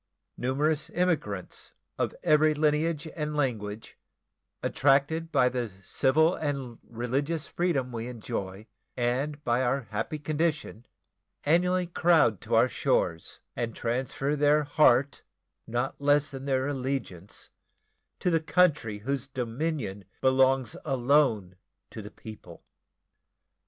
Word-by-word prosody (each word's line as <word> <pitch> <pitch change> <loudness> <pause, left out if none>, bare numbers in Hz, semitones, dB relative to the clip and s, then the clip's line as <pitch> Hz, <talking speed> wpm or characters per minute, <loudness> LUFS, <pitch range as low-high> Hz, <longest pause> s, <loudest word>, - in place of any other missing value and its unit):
Numerous 145 +4 0
emigrants, 155 - -2 0.2
of - - -1
every 155 -1 +4
lineage 150 +1 +1
and 150 -1 -3
language, 110 -6 -3 0.6
attracted 145 +5 +2
by 130 -5 +4
the 125 -3 -2
civil 160 - +3
and 140 -7 -4
religious 135 +7 -2
freedom 145 -8 -1
we 115 0 -4
enjoy 105 -4 -5 0.3
and 135 +5 -1
by 120 -1 +1
our 130 +2 +1
happy 105 +8 -2
condition, 155 -5 -2 0.6
annually 180 +4 +3
crowd 165 - +3
to - - -1
our - - +5
shores, 80 0 -1
and 115 -2 -3
transfer 130 +4 -1
their 150 +1 +3
heart, 140 -2 +3 0.5
not 120 +4 -2
less 145 +1 +3
than 135 0 -7
their 130 -1 0
allegiance, 130 -9 -4 0.7
to 180 - +1
the 165 -1 +2
country 150 - +2
whose 135 -1 -2
dominion 125 -4 -3 0.2
belongs 130 -2 +3
alone 125 - +2 0.3
to 110 - -7
the 105 - -9
people. 105 -7 -12
135 Hz, 115 wpm, -28 LUFS, 120-150 Hz, 0.7 s, our